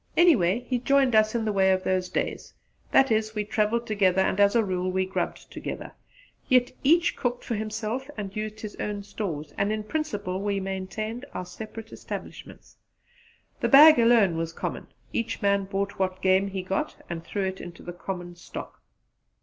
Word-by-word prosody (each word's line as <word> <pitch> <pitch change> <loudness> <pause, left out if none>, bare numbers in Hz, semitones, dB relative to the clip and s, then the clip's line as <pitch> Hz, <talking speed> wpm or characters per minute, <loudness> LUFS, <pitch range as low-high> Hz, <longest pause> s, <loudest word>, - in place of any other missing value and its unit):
Anyway, 240 - +5
he 250 -2 0
joined 270 0 +3
us 215 +1 +4
in 225 -1 0
the 215 - 0
way 190 -1 +4
of 185 0 +1
those 185 -1 0
days: - - -3 0.4
that 270 -3 +5
is, 220 0 +1
we 210 - 0
travelled 220 +2 0
together 190 -4 +2
and 190 - 0
as 200 +2 +5
a 230 - +4
rule 185 -1 -1
we 190 0 +1
grubbed 190 - -4
together; - - -6 0.6
yet 250 -2 +4
each 335 +5 +4
cooked 245 -1 -2
for - - -3
himself 220 +5 -3
and 200 -2 -5
used 215 0 -4
his 210 -2 -7
own 205 -1 -3
stores, 160 -8 -5
and 200 +1 +1
in 215 0 -2
principle 205 -8 -3
we 200 -1 0
maintained 195 +5 -4
our 180 - -3
separate 220 +4 -9
establishments. - - -9 0.8
The - - 0
bag 300 +1 +9
alone 230 -7 +4
was 165 0 -3
common; - - -5 0.3
each 230 0 -2
man 200 -1 +2
brought 200 0 -3
what 185 0 -1
game 190 +1 +4
he 190 -1 -4
got 190 +1 -2
and 165 -1 -5
threw 200 +3 -3
it 190 0 -3
into 175 -1 -10
the 175 - -7
common 175 -1 -6
stock. - - -9
205 Hz, 180 wpm, -26 LUFS, 190-230 Hz, 0.8 s, bag